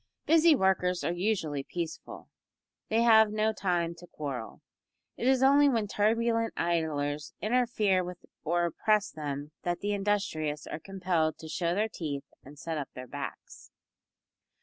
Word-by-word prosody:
Busy 325 0 +6
workers 185 -4 +1
are - - 0
usually 175 -6 -1
peaceful. 165 +3 -6 0.6
They 225 +1 +3
have 220 -2 +7
no 215 +1 +1
time 175 -4 0
to 175 - -12
quarrel. 140 -8 -6 0.5
It 240 - -2
is 265 0 +4
only 285 +2 +6
when 230 -5 +1
turbulent 230 +2 +1
idlers 150 -3 -1
interfere 215 -5 +2
with 180 0 -8 0.2
or 175 +2 +1
oppress 210 +4 +1
them 145 -1 -5
that 175 0 -2
the 205 0 -1
industrious 195 -7 -1
are - - -6
compelled 180 -4 -1
to 160 - -10
show 170 +2 -1
their 215 +2 +1
teeth 150 -9 -5 0.2
and 145 +2 -13
set 160 +1 -4
up 140 - -5
their 125 - -7
backs. - - -8
180 Hz, 150 wpm, -29 LUFS, 155-215 Hz, 0.6 s, have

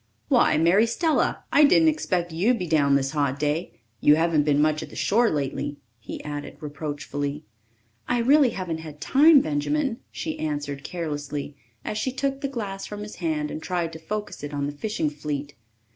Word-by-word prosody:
"Why, - - +4
Mary 180 +8 +4
Stella! 315 +7 +1
I 295 - +7
didn't 315 +2 +6
expect 180 - -1
you'd 205 +10 +2
be 180 - -3
down 145 -4 +3
this 135 -1 +1
hot 140 -3 0
day. 150 +3 -2 0.2
You 150 - +6
haven't 160 -2 +2
been 145 -1 +3
much 155 +1 +2
at - - -7
the - - -12
shore 230 +3 +3
lately," 145 0 -2 0.2
he - - -8
added 145 -1 -6
reproachfully. 145 -1 -4 0.6
"I 245 - +1
really 270 +3 +5
haven't 180 -6 -4
had 155 -2 -9
time, 285 - +6
Benjamin," 230 - -1
she 315 - -5
answered 145 -2 -3
carelessly, 145 -3 -4 0.3
as 210 - -2
she 260 - -1
took 275 +1 -2
the 280 - -1
glass 205 -7 -5
from 210 0 -7
his 210 0 -8
hand 155 -4 -1
and 155 - -5
tried 170 -2 -2
to 160 - -8
focus 210 +6 -5
it 145 0 -5
on 140 0 -1
the 145 - -2
fishing 155 0 -2
fleet. 145 -1 -5
160 Hz, 185 wpm, -25 LUFS, 145-215 Hz, 0.6 s, I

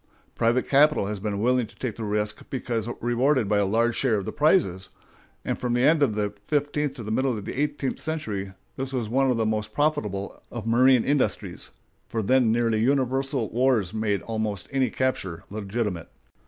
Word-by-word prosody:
Private 120 +2 +1
capital 145 -5 +4
has 105 0 -4
been 100 0 -3
willing 125 +1 +2
to - - -19
take 125 -5 -4
the 115 - -6
risk 105 0 -2
because 120 -4 -3
rewarded 120 0 +2
by 105 0 +2
a 100 - +2
large 115 +3 +2
share 125 -5 +2
of 100 -2 -2
the - - -3
prizes; 120 - +2 0.6
and - - -2
from 125 -1 -1
the 120 +1 +2
end 155 +2 +4
of 130 -7 +2
the 105 -1 -1
fifteenth 145 -1 0
to 120 - -7
the 110 - -5
middle 130 0 +1
of 105 - -7
the 135 - -3
eighteenth 145 -2 -2
century 105 -12 -3 0.2
this 135 0 -4
was 120 -5 -2
one 135 +3 +2
of 125 - +1
the 110 - +1
most 110 -1 -2
profitable 110 -11 -1
of 120 -2 -6
marine 125 +2 +5
industries, 145 -1 -1 0.4
for 110 -1 -2
then 125 +1 +3
nearly 115 -1 +1
universal 135 0 0
wars 120 -6 +2
made 105 -2 -1
almost 110 -4 -3
any 135 -3 +1
capture 105 -10 -2
legitimate. 105 -3 -3
120 Hz, 190 wpm, -25 LUFS, 105-135 Hz, 0.6 s, marine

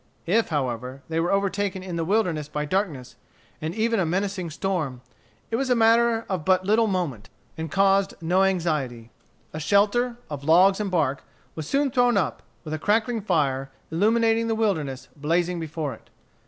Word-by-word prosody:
If, 220 +6 +2
however, 130 -2 -3
they 165 0 0
were 170 +2 0
overtaken 200 -1 0
in 180 -2 -5
the 165 - -1
wilderness 175 -6 0
by 150 0 -3
darkness, 155 -7 -2 0.4
and 160 +3 -3
even 225 0 +1
a - - +3
menacing 190 0 -2
storm, 155 -7 -2 0.5
it 225 - +1
was 270 +1 -1
a 250 - +4
matter 230 0 +3
of 185 -5 -2
but 185 +1 +2
little 220 +3 +3
moment, 160 - -2 0.3
and 160 0 -5
caused 195 0 +3
no 175 +3 +2
anxiety. 150 -11 -1 0.4
A 155 - -4
shelter, 210 +8 +2
of 145 -2 -6
logs 185 +6 +5
and 210 -2 -1
bark, 145 -7 0 0.3
was 155 -2 -6
soon 280 -1 +1
thrown 245 -1 +3
up, - - -1 0.2
with 155 -2 -6
a 155 - -2
crackling 220 +5 +1
fire, 140 -8 0 0.2
illuminating 225 +5 +2
the 225 - 0
wilderness, 160 - -1
blazing 170 +4 0
before 155 -3 -4
it. - - -16
180 Hz, 170 wpm, -25 LUFS, 155-210 Hz, 0.5 s, logs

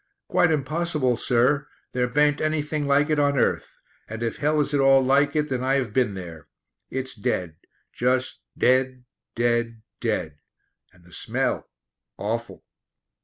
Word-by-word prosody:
"Quite 180 - +3
impossible, 155 -3 0
sir; 125 +5 +2 0.2
there 125 0 0
baint 150 +3 +2
anything 150 -1 -1
like 145 +2 +3
it 150 - +2
on 140 -1 +2
earth, - - 0 0.3
and 115 +1 -6
if 115 - -2
hell 150 +1 +1
is 145 0 0
at 145 - +2
all 135 -1 +5
like 140 +2 +3
it 150 -1 +1
then 130 -1 -2
I 135 +1 +2
have 125 -6 -1
been 120 -5 +1
there. 85 -5 -9 0.4
It's 130 0 -4
dead; 90 -6 -2 0.4
just 130 +1 0 0.2
dead 130 0 +2 0.3
dead 120 -1 0 0.2
dead! 75 -2 -2 0.5
And 90 -1 -23
the 85 0 -17
smell - - -2 0.5
awful." 115 +3 -4
130 Hz, 150 wpm, -24 LUFS, 115-145 Hz, 0.5 s, all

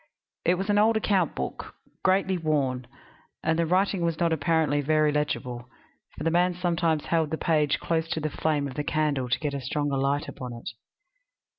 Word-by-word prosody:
It 175 - +4
was 195 +3 -1
an 205 - +4
old 220 +1 +4
account 195 -6 +1
book, 65 - -5 0.3
greatly 190 0 +3
worn; 140 -7 0 0.6
and 160 +1 +1
the 165 - +2
writing 185 +2 +2
was 170 -2 0
not, 170 -1 +2
apparently, 155 -1 +1
very 155 +1 +3
legible, 125 -5 -2 0.5
for - - -5
the 165 - +1
man 175 +1 +2
sometimes 170 -3 0
held 165 -2 +1
the 160 - -2
page 150 -3 +2
close 165 -1 -1
to 160 - -1
the 155 -1 -2
flame 150 -2 0
of 135 - -7
the 150 - -3
candle 145 -4 0
to - - +1
get 150 -2 -2
a 140 - -3
stronger 145 +2 -1
light 140 +2 0
upon 125 -2 -7
it. 115 -1 -7
155 Hz, 190 wpm, -26 LUFS, 145-170 Hz, 0.6 s, It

